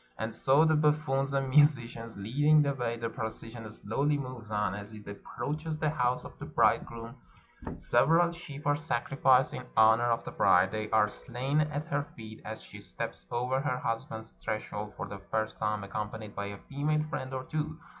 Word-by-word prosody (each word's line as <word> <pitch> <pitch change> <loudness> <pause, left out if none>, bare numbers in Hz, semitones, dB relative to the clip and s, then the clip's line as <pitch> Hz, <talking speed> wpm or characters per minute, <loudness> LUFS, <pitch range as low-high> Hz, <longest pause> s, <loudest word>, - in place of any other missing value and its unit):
And 110 +1 -3
so, 135 +7 +4
the 160 - +4
buffoons 150 -2 +2
and 135 -1 0
musicians 120 -6 +3
leading 145 +9 +4
the 140 -1 +1
way, 120 -3 -2
the 115 0 -2
procession 115 0 -6
slowly 140 +8 0
moves 130 -5 -6
on. 105 -3 0
As 105 +1 -7
it 105 -1 -11
approaches 155 +9 -4
the 155 -1 +1
house 125 -3 0
of - - -11
the - - -6
bridegroom 115 +2 +1 0.6
several 170 +3 +4
sheep 150 -4 -9
are 145 0 +4
sacrificed 135 -3 +2
in - - -5
honor 110 +2 +6
of 115 0 +1
the - - -5
bride; 90 +2 +4
they 110 0 -3
are 110 -1 +4
slain 130 +7 -2
at 150 0 -2
her 145 -1 +1
feet 110 -1 -10
as 110 +1 -7
she - - -11
steps - - -6
over 125 +2 0
her 130 -3 0
husband's 115 -2 -4
threshold 105 -1 -4
for 105 - -4
the 100 0 -7
first 110 0 -1
time, 105 -1 0
accompanied 105 +1 -5
by 100 0 -3
a 100 0 -6
female 150 +2 0
friend 130 -4 -4
or 130 -1 -3
two. 155 +2 -3
120 Hz, 185 wpm, -30 LUFS, 110-145 Hz, 0.6 s, honor